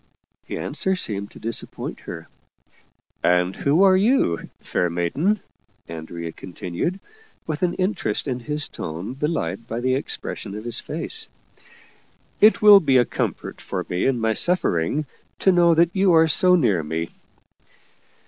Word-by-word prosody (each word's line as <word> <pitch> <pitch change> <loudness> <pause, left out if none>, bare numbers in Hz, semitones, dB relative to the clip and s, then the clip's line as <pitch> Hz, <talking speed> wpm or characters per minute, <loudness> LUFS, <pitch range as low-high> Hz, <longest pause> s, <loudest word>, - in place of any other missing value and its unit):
The - - -4
answer 190 0 -1
seemed 100 - -1
to - - -14
disappoint 115 +1 -3
her. - - -9 0.5
" - - -38
And 90 +1 +2
who 150 +7 +2
are 190 -1 +6
you, 200 - +1
fair 90 - -1
maiden? 135 - 0 0.2
" - - -41
Andrea 85 +1 -7
continued, 90 - -5 0.5
with 155 -2 -4
an 180 -1 +1
interest 185 - -1
in 125 -2 -2
his 150 +4 -2
tone 85 +9 -6
belied 115 - -3
by 115 - -4
the 130 +1 0
expression 115 -6 -5
of 105 - -7
his 120 0 -3
face. 445 - -5 0.6
" - - -34
It 215 0 +5
will 205 -1 +10
be 140 -7 +3
a 120 - +4
comfort - - -4
for - - -4
me 90 +6 0
in 130 -3 +1
my 110 0 +1
suffering, 150 - +2 0.3
to 190 - +3
know 170 -2 +4
that 170 +1 +3
you 190 -2 +4
are 160 0 +6
so 180 +4 +5
near 110 - +2
me." 80 +2 -4
130 Hz, 160 wpm, -22 LUFS, -, 0.6 s, will